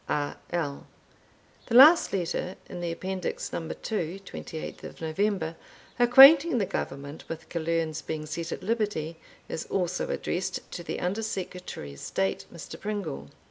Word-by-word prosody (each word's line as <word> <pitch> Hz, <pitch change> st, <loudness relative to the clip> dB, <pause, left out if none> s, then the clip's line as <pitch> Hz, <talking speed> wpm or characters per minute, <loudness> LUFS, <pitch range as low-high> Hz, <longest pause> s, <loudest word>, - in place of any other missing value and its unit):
R. 145 Hz, -1 st, -1 dB
L. 155 Hz, -5 st, -2 dB, 0.8 s
The 235 Hz, -, -1 dB
last 300 Hz, +7 st, +9 dB
letter 180 Hz, 0 st, -2 dB
in 175 Hz, -, -7 dB
the 170 Hz, -1 st, -2 dB
Appendix 185 Hz, +2 st, -4 dB
No. -, -, -1 dB
II. 170 Hz, +2 st, -3 dB
(28th 165 Hz, -4 st, -8 dB
November), 165 Hz, +1 st, -1 dB, 0.4 s
acquainting 275 Hz, +5 st, +9 dB
the 205 Hz, -, +2 dB
Government 140 Hz, -2 st, -5 dB
with 165 Hz, 0 st, -6 dB
Killearn's 165 Hz, -1 st, -1 dB
being 155 Hz, 0 st, -4 dB
set 165 Hz, +2 st, -4 dB
at -, -, -5 dB
liberty, 200 Hz, -7 st, -1 dB, 0.3 s
is 160 Hz, -, -4 dB
also 180 Hz, -1 st, -1 dB
addressed 180 Hz, +2 st, -2 dB
to 175 Hz, -, -6 dB
the -, -, -4 dB
Under 190 Hz, +5 st, -1 dB
Secretary 180 Hz, -, -5 dB
of 70 Hz, -, -12 dB
State, 95 Hz, 0 st, -2 dB
Mr. 170 Hz, -, -9 dB
Pringle. 205 Hz, -8 st, -4 dB
175 Hz, 140 wpm, -28 LUFS, 160-205 Hz, 0.8 s, last